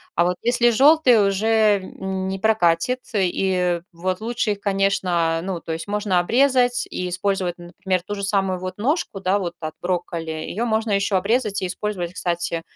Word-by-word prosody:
А 170 Hz, -, +3 dB
вот 180 Hz, 0 st, +1 dB
если 240 Hz, 0 st, +3 dB
жёлтые 255 Hz, -4 st, +5 dB
уже 215 Hz, +1 st, +3 dB
не 190 Hz, 0 st, -4 dB
прокатит, 220 Hz, +2 st, +2 dB, 0.2 s
и 180 Hz, -2 st, +1 dB
вот 185 Hz, +3 st, -3 dB
лучше 235 Hz, -1 st, -1 dB
их, 200 Hz, -, -3 dB
конечно, 185 Hz, -5 st, +1 dB
ну, 185 Hz, -3 st, -3 dB
то 165 Hz, -, -6 dB
есть 165 Hz, +5 st, -5 dB
можно 205 Hz, -3 st, +1 dB
обрезать 250 Hz, +4 st, +2 dB
и 180 Hz, 0 st, -3 dB
использовать, 185 Hz, -1 st, -1 dB
например, 180 Hz, +1 st, -3 dB
ту 205 Hz, -, -5 dB
же 200 Hz, -1 st, -5 dB
самую 195 Hz, -2 st, 0 dB
вот 185 Hz, +1 st, -6 dB
ножку, 250 Hz, -, -1 dB
да, 195 Hz, +2 st, +1 dB
вот 175 Hz, -2 st, -4 dB
от 155 Hz, 0 st, -4 dB
брокколи, 175 Hz, -2 st, -3 dB
её 165 Hz, +8 st, -3 dB
можно 220 Hz, 0 st, 0 dB
ещё 200 Hz, 0 st, +1 dB
обрезать 210 Hz, 0 st, 0 dB
и -, -, 0 dB
использовать, 180 Hz, -2 st, -4 dB
кстати, 170 Hz, -2 st, -2 dB
195 Hz, 170 wpm, -22 LUFS, 180-215 Hz, 0.2 s, жёлтые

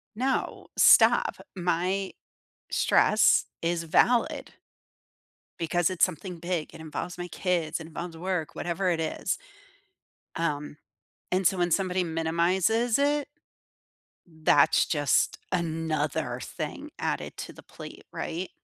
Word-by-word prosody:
No. 260 Hz, +3 st, -2 dB
Stop. -, -, +6 dB, 0.2 s
My 185 Hz, +2 st, -1 dB, 0.6 s
stress 215 Hz, 0 st, +4 dB
is 170 Hz, 0 st, -1 dB
valid. 230 Hz, +9 st, +2 dB, 1.1 s
Because 175 Hz, +1 st, +1 dB
it's 185 Hz, -, +3 dB
something 180 Hz, 0 st, -5 dB
big. 170 Hz, -2 st, -3 dB
It 165 Hz, -, -10 dB
involves 160 Hz, +3 st, -5 dB
my 175 Hz, 0 st, -5 dB
kids, 175 Hz, -4 st, -1 dB
it 160 Hz, -, -8 dB
involves 165 Hz, +1 st, -7 dB
work, 175 Hz, -2 st, -3 dB
whatever 180 Hz, +2 st, -1 dB
it 165 Hz, -, 0 dB
is." 160 Hz, -, -2 dB, 1.0 s
Um. 150 Hz, -2 st, -2 dB, 0.6 s
And 185 Hz, -1 st, +2 dB
so, 185 Hz, +1 st, +3 dB
when 175 Hz, 0 st, +1 dB
somebody 185 Hz, -1 st, +1 dB
minimizes 175 Hz, +8 st, +1 dB
it 290 Hz, 0 st, +1 dB, 1.0 s
that's 160 Hz, -2 st, +3 dB
just 145 Hz, -5 st, +1 dB
another 160 Hz, -3 st, -1 dB
thing -, -, -6 dB
added -, -, -3 dB
to -, -, -6 dB
the -, -, -14 dB
plate. -, -, -11 dB
Right? 175 Hz, +3 st, -4 dB
175 Hz, 115 wpm, -27 LUFS, 160-185 Hz, 1.1 s, Stop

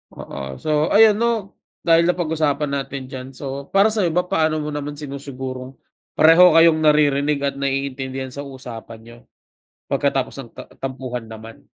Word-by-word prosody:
Oo. 65 Hz, -1 st, -7 dB
So, 155 Hz, -, 0 dB
ayun 210 Hz, +1 st, +5 dB
'no, 230 Hz, -4 st, 0 dB, 0.3 s
dahil 165 Hz, 0 st, +4 dB
napag-usapan 155 Hz, -4 st, 0 dB
natin 135 Hz, -1 st, -4 dB
diyan. 130 Hz, -1 st, -7 dB
So, 140 Hz, +1 st, -6 dB
para 200 Hz, +3 st, +3 dB
sa'yo 210 Hz, -4 st, +1 dB
ba, 180 Hz, -, +3 dB
paano 160 Hz, -4 st, +1 dB
mo 150 Hz, -, -4 dB
naman 145 Hz, 0 st, -5 dB
sinusigurong 135 Hz, -2 st, -7 dB, 0.4 s
pareho 165 Hz, +3 st, +7 dB
kayong 165 Hz, -1 st, +6 dB
naririnig 150 Hz, -1 st, +3 dB
at 140 Hz, -1 st, 0 dB
naiintindihan 135 Hz, -1 st, -3 dB
sa 140 Hz, -, -6 dB
usapan 120 Hz, -4 st, -9 dB
niyo 115 Hz, +1 st, -14 dB, 0.8 s
pagkatapos -, -, 0 dB
ng -, -, -11 dB
ta -, -, -7 dB, 0.2 s
tampuhan 130 Hz, -2 st, -5 dB
naman? 110 Hz, 0 st, -11 dB
140 Hz, 150 wpm, -21 LUFS, 130-160 Hz, 0.8 s, pareho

